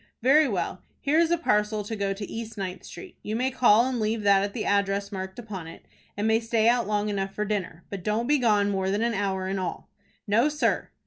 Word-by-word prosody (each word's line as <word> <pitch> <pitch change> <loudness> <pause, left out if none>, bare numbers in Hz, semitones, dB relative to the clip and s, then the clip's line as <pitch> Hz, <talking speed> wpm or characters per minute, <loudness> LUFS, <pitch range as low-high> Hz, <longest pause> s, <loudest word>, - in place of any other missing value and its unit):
"Very 295 +4 +5
well, 180 -2 -3 0.2
here 300 +3 +2
is 335 -1 +3
a 345 - +2
parcel 210 -8 +1
to 220 +2 -5
go 200 -1 -1
to 200 +1 -4
East 225 -1 -7
Ninth 185 -2 -5
Street. 375 -2 -11
You 215 - -4
may 255 +3 0
call 240 -3 +5
and 255 -2 -2
leave 215 0 -1
that 200 -1 +5
at 200 0 -3
the 220 - -2
address 200 0 0
marked 190 -1 -6
upon 205 -8 -7
it, 165 - -12 0.3
and 210 +2 0
may 220 0 +3
stay 225 -1 +1
out 240 -1 +3
long 210 0 0
enough 195 -1 -3
for 210 - -1
dinner. 190 -5 -3
But 195 -3 -5
don't 215 +3 0
be 295 +3 +3
gone 210 -4 +3
more 190 -1 -1
than 205 +3 0
an 235 0 +1
hour 195 -2 -1
in 190 0 -2
all." 185 - -5 0.3
"No, 230 +8 +3
sir." 300 0 0
210 Hz, 240 wpm, -26 LUFS, 195-235 Hz, 0.3 s, Very